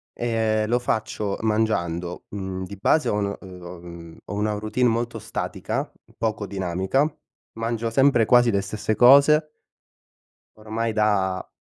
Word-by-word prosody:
e 110 -2 0
lo 120 +2 +2
faccio 110 -3 -2
mangiando, 90 -6 -1
mhmm, 95 -2 -5
di 100 - -8
base 155 +10 +2
ho - - 0
un 100 -1 -1
mh 95 - -12 0.2
uhm 85 0 -10 0.3
mh, - - -17
ho - - -6
una 105 +1 0
routine 110 +4 0
molto 115 +1 -2
statica, - - -4 0.3
poco 110 -2 -2
dinamica, 95 - 0 0.5
mangio 115 0 -2
sempre 125 -2 +4
quasi 120 0 +5
le 100 -1 +1
stesse 105 +2 -2
cose 140 +6 +6 1.1
ormai 110 +1 -3
da 100 -3 +1
110 Hz, 140 wpm, -24 LUFS, 100-115 Hz, 1.1 s, cose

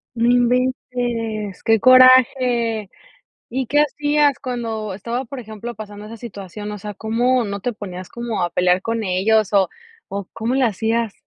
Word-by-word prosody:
No 230 +1 +1
inventes. 245 -4 0
Qué 225 -1 +3
coraje. 255 -3 +5 0.6
¿Y 260 +1 -2
qué 295 +5 +3
hacías 295 -1 +1
cuando 225 -5 -4
estaba, 235 +6 -4
por 260 +3 -8
ejemplo, 220 +2 -8
pasando 205 -1 -9
esa 225 +2 -9
situación? 205 -2 -8
O 210 - -5
sea, 210 +1 -7
¿cómo 240 +4 +1
no 200 -1 -4
te 245 +5 -3
ponías 185 -4 -8
como 235 -4 -4
a 175 - 0
pelear 180 +1 +2
con 230 0 -2
ellos, 200 +3 +2
o 450 - -2
cómo 230 +3 -2
le 270 - +2
hacías? 225 0 0
230 Hz, 155 wpm, -20 LUFS, 210-250 Hz, 0.6 s, coraje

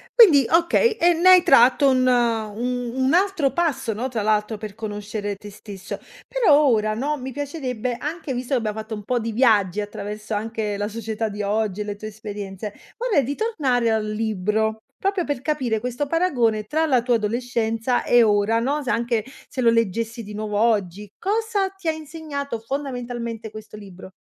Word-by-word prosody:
Quindi, 335 - +7
okay, 340 +8 +4
e 350 -4 +3
ne 345 +3 +4
hai 365 -1 +8
tratto 270 +2 +6
un 255 -1 +3
un 240 0 0
un 265 +2 +1
altro 355 -6 +2
passo, 320 -9 0
no, 240 +5 -3
tra 230 -4 -2
l'altro 215 +1 +1
per 210 -1 -8
conoscere 205 -1 -4
te 205 +1 -11
stesso. 200 -1 -8 0.3
Però 440 -13 +4
ora, 215 -3 +2
no, 290 +6 -1
mi 260 0 -6
piacerebbe 260 -4 -3
anche 305 0 -4
visto 250 +2 -3
che 255 - +3
abbiamo 220 -1 -3
fatto 220 0 -5
un 210 - -8
po' 245 +3 0
di 230 0 -3
viaggi 210 -6 +3
attraverso 210 +1 -6
anche 215 0 -2
la 205 0 -2
società 220 0 -3
di 205 0 -5
oggi 210 -1 -1
e - - -1
le 205 - -4
tue 215 +1 -8
esperienze, 205 -1 -7 0.2
vorrei 455 - +2
ritornare 275 - 0
al 220 -1 0
libro, 220 0 -1 0.2
proprio 390 -2 0
per 285 -4 -3
capire 260 -6 -1
questo 250 +5 -3
paragone 250 -10 +1
tra 315 +8 0
la 255 -5 +3
tua 245 -1 +2
adolescenza 230 +1 -1
e 240 -1 +5
ora, 210 +1 +2
no, 280 +6 0
se 255 - -4
anche 230 0 0 0.2
se 260 - -4
lo 235 - +5
leggessi 230 +1 0
di 210 0 -9
nuovo 210 -1 -2
oggi. 210 -3 +1
Cosa 415 0 0
ti 385 -2 -10
ha - - +4
insegnato 305 -5 -5
fondamentalmente 240 -3 -5
questo 215 0 -10
libro? 190 -2 -11
230 Hz, 180 wpm, -23 LUFS, 215-280 Hz, 0.3 s, hai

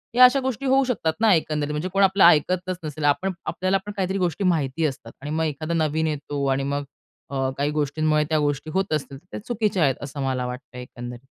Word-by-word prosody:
या 250 - +8
अशा 250 +2 +5
गोष्टी 265 0 -3
होऊ 270 +1 +4
शकतात 200 -11 0
ना 220 -3 +6
एकंदरीत. 150 -3 0
म्हणजे 150 +5 -2
कोण 195 0 +4
आपलं 195 0 +4
ऐकतच 180 +3 +4
नसेल. 155 0 -5
आपण 165 +7 +2
आपल्याला 185 +1 0
पण 205 - -5
काहीतरी 190 0 0
गोष्टी 180 0 -1
माहिती 160 -4 +1
असतात. 130 -5 -4
आणि 145 +2 -5
मग 160 +1 0
एखादा 155 +2 -3
नवीन 160 -1 +1
येतो 145 -2 -3
आणि 135 +1 0
मग 140 +1 -2 0.5
अ, 135 -1 0
काही 145 +1 0
गोष्टींमुळे 150 +1 +1
त्या 155 - +2
गोष्टी 145 +1 -1
होत 190 -3 0
असतील 140 -2 -3
तर 140 - -21
त्या - - -5
चुकीच्या 210 -6 +1
आहेत 135 -3 +3
असं 140 0 -6
मला 130 -2 -1
वाटतंय 125 0 -7
एकंदरीत. 120 -1 -8
155 Hz, 215 wpm, -24 LUFS, 140-185 Hz, 0.5 s, या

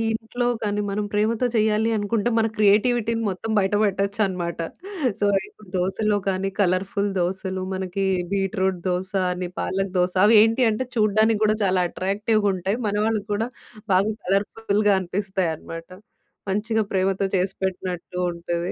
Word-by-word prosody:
ఇంట్లో 240 +2 -2 0.2
కానీ, 210 0 0
మనం 205 +1 -1
ప్రేమతో 215 +4 +1
చేయాలి 220 0 +2
అనుకుంటే 210 +2 0
మన 225 0 +3
క్రియేటివిటీని 225 +2 +3
మొత్తం 195 +4 -4
బయట 195 0 0
బెట్టొచ్చనమాట. 195 -3 -1 0.6
సో, - - +2 0.2
ఇప్పుడు 210 -1 -18
దోసలో 205 +3 +1
కానీ, 190 +1 -1
కలర్‌ఫుల్ 195 +2 +1
దోసలు 185 +1 -2
మనకి 190 +1 -2 0.3
బీట్రూట్ 190 -1 0
దోస 180 +1 -2 0.2
అని, 180 0 -3
పాలక్ 195 0 -1
దోస 180 0 +2
అవేంటి 225 +3 +5
అంటే 220 +4 -1
చూడ్డానికి 215 0 +3
గూడా 215 0 +3
చాలా 185 -2 +2
అట్రాక్టివ్‌ 205 +5 0
గుంటాయి. 195 +3 -1
మన 205 - -1
వాళ్ళకి 215 -2 -1
కూడా 220 +3 0 0.5
బాగా 195 +4 +3
కలర్‌ఫుల్‌గా 205 +2 +1
అనిపిస్తాయనమాట. 180 -3 -3 0.6
మంచిగా 220 +3 0
ప్రేమతో 190 +1 +1
చేసిపెట్టినట్టు 185 -1 -3
ఉంటది. 170 +1 -3
200 Hz, 130 wpm, -23 LUFS, 185-215 Hz, 0.6 s, అవేంటి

